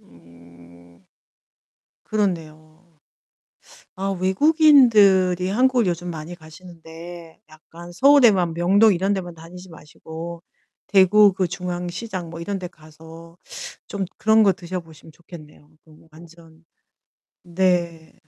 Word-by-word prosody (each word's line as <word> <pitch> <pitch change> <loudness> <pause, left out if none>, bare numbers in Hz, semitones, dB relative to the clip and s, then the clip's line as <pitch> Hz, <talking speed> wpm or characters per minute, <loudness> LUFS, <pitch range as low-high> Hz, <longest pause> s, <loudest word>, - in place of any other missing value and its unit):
음 85 +1 -21 1.0
그렇네요. 160 -7 -4 1.2
아 195 +1 -4
외국인들이 200 - +3
한국을 250 +2 +1
요즘 175 0 -3
많이 160 +1 -8
가시는데 165 0 -13
약간 165 +2 -14
서울에만 220 - +4
명동 195 +5 +3
이런 190 +3 -1
데만 180 -3 -5
다니지 180 +3 -13
마시고 165 +2 -10 0.5
대구 200 +1 +4
그 185 -1 -1
중앙시장 180 +1 -6
뭐 165 0 -9
이런 195 +3 -5
데 180 - -6
가서 160 +1 -16 0.5
좀 200 -1 -4
그런 220 0 +3
거 195 - +4
드셔보시면 170 -4 -10
좋겠네요 155 -3 -16 0.2
너무 155 0 -21
완전. 165 0 -18 0.8
네. 175 -2 -2
175 Hz, 235 characters per minute, -21 LUFS, 160-190 Hz, 1.2 s, 서울에만